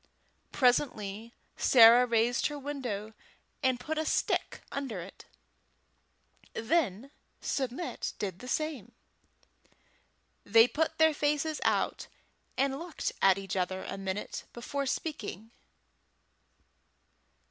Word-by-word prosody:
Presently 230 -4 +1 0.3
Sarah 240 0 +7
raised 235 +1 +2
her 295 - -6
window, 250 -7 -5 0.5
and 260 -2 +1
put 315 +5 -3
a - - +1
stick - - 0
under 265 -8 -4
it; 180 +3 -10 1.3
then 250 - 0 0.3
Submit 265 +5 -3
did 190 -4 -4
the 250 - -9
same. 265 -6 -3 1.5
They 225 +3 +6
put 315 +5 -1
their 320 0 +5
faces 300 +1 0
out, - - 0 0.5
and 270 +1 +1
looked 345 -1 -4
at 195 -1 +5
each 195 -1 -5
other 185 0 -1
a - - -5
minute 195 +1 -4
before 275 +3 -3
speaking. 260 - -4
245 Hz, 105 wpm, -30 LUFS, 210-290 Hz, 1.5 s, Sarah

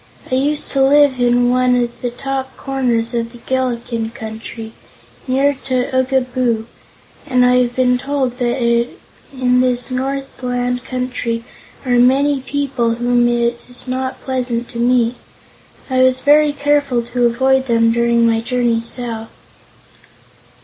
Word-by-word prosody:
"I - - -1
used 285 +3 0
to 275 - +1
live 280 -1 +4
in 245 0 +3
one 250 0 +3
of 240 -1 -2
the 245 - -1
top 265 +2 -5
corners 245 -4 -1
of 230 0 -2
the - - -11
Gillikin 235 -2 -2
Country, 220 0 -8 0.5
near 270 +2 +2
to 255 0 -1
Oogaboo, 255 -3 0 0.6
and 250 -2 +3
I 250 0 +4
have 245 -1 +1
been 250 -1 +2
told 270 -2 -2
that 245 +1 0
in 250 +2 -1
this 250 0 0
northland 255 -2 -3
country 250 -3 -3 0.4
are 245 -1 +2
many 270 +3 +3
people 260 -4 -1
whom 240 0 +2
it 235 0 0
is 245 +1 -4
not 260 +1 -3
pleasant 245 -3 -2
to 235 - -7
meet. 240 0 +2 0.7
I 260 -1 +1
was 255 0 +4
very 295 +1 +4
careful 285 -4 +1
to 240 +1 +1
avoid 265 +2 +1
them 230 -1 +3
during 235 0 +2
my 225 -1 +2
journey 240 -1 0
south." 230 -1 -4
250 Hz, 140 wpm, -17 LUFS, 235-260 Hz, 0.7 s, live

